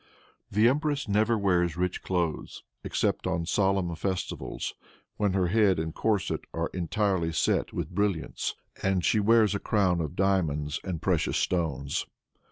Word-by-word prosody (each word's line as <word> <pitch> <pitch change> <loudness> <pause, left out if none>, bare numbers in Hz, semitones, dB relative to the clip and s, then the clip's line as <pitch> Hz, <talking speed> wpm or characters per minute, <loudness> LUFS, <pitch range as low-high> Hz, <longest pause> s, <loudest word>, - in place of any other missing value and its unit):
"The 105 +3 +4
empress 145 0 0
never 110 +3 +2
wears 90 -4 +1
rich 90 0 -1
clothes 85 -4 -2 0.2
except - - -1
on 85 - -1
solemn 95 -1 +1
festivals, 95 +2 -3 0.4
when 105 -3 +1
her 95 -2 +1
head 100 -2 +4
and 80 0 -3
corset 105 -4 0
are - - -2
entirely 90 -1 0
set - - +1
with - - -4
brilliants, 100 -5 -1 0.3
and 95 -2 +1
she 110 - +3
wears 110 0 +4
a 100 - -1
crown 95 -5 +1
of 80 +1 -4
diamonds 80 -7 0
and 85 -4 -4
precious 90 -4 +1
stones. 70 -6 -1
95 Hz, 145 wpm, -28 LUFS, 85-105 Hz, 0.4 s, The